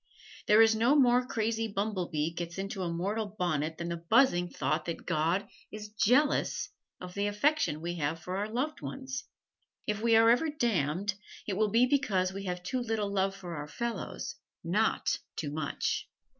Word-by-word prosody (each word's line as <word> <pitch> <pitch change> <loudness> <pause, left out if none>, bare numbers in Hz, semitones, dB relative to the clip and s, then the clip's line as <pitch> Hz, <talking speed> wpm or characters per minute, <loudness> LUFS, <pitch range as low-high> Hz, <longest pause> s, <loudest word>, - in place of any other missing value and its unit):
There 215 +2 +8
is 225 0 +5
no 235 +6 +4
more 250 -3 +4
crazy 225 -1 -1
bumblebee 185 -7 -2
gets 170 0 -5
into 195 0 -4
a 175 - -1
mortal's 205 +4 -2
bonnet 160 -4 -1
than 170 0 -4
the 170 - -2
buzzing 220 -8 +4
thought - - -1
that 170 - -5
God 165 +6 +1 0.2
is 210 0 -7
jealous 250 +7 +2 0.3
of 180 0 -8
the 200 +1 0
affection 210 - +1
we 175 +1 -3
have 155 +1 -1
for 185 +3 -4
our 205 +2 -2
loved 265 +7 -2
ones. 265 0 -5 0.6
If 210 0 -2
we 230 0 +4
are 225 +1 +7
ever 270 +7 +3
damned, 200 - 0 0.3
it 200 - -1
will 215 +1 +2
be 230 +4 +5
because 195 -9 +1
we 195 0 -6
have 180 -1 -3
too 255 +8 -2
little 220 -4 -1
love 195 0 +1
for 180 -3 -7
our 150 0 -5
fellows, 235 +8 -4 0.3
not - - +1 0.2
too 145 -3 -3
much. 150 -1 -2
205 Hz, 175 wpm, -30 LUFS, 175-230 Hz, 0.6 s, There